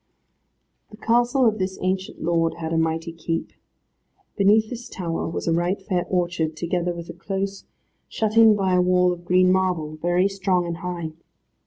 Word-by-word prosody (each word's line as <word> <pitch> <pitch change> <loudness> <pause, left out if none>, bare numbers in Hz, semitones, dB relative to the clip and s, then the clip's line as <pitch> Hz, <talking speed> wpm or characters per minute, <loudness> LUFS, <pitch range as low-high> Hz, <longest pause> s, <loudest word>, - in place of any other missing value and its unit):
The 210 - -13
castle 240 +3 +2
of 215 -2 +2
this 190 0 -2
ancient 185 +1 -3
lord 165 0 +1
had 165 -1 -4
a - - +1
mighty 160 +1 -1
keep. 165 0 -4 0.8
Beneath 215 +2 +3
this 240 -1 -7
tower 170 -3 -3
was 165 - -4
a 165 - +3
right 175 +4 0
fair 185 -2 -2
orchard, 175 -3 -1
together 175 +1 -1
with 170 -1 -8
a - - -6
close, 195 +3 -4 0.4
shut 220 -1 -1
in 225 -2 +7
by 190 -2 0
a 180 - +4
wall 180 0 +3
of 175 0 -11
green 185 +1 +4
marble, 180 -5 0
very 175 +4 +2
strong 190 -2 0
and 170 -1 -4
high. 175 -3 -5
180 Hz, 175 wpm, -23 LUFS, 170-195 Hz, 0.8 s, in